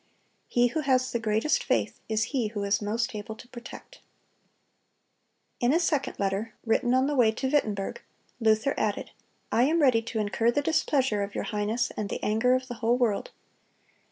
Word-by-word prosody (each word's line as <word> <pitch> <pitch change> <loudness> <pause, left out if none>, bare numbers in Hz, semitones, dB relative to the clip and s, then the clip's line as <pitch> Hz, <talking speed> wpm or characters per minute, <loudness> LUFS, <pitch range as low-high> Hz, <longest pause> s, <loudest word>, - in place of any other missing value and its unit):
He 245 0 +3
who 315 - -2
has 260 -3 +1
the 235 - -1
greatest 220 +6 +1
faith - - 0
is 220 0 +1
he 250 -5 +1
who 210 -1 -4
is 200 +1 +1
most 225 +3 -1
able 215 +1 -6
to 240 - -13
protect."(271) 250 - -11 1.7
In - - +4
a - - +4
second 310 -5 0
letter, 200 +3 -2
written 240 +2 +2
on 260 +1 +3
the 290 - 0
way 235 -4 +5
to 265 +4 -2
Wittenberg, 215 -9 -1 0.4
Luther 220 +3 +2
added: 210 -2 -1 0.4
"I 240 - +4
am 320 +4 +2
ready 255 -6 +4
to 225 0 -5
incur 215 +2 +1
the 290 +4 +1
displeasure 270 -8 +1
of 200 0 -4
your - - -1
highness 215 +2 -1
and 210 -2 -3
the - - -5
anger 225 +4 +3
of 255 0 -2
the 245 - -5
whole 235 +2 +3
world. 230 -5 0
230 Hz, 185 wpm, -27 LUFS, 215-255 Hz, 1.7 s, way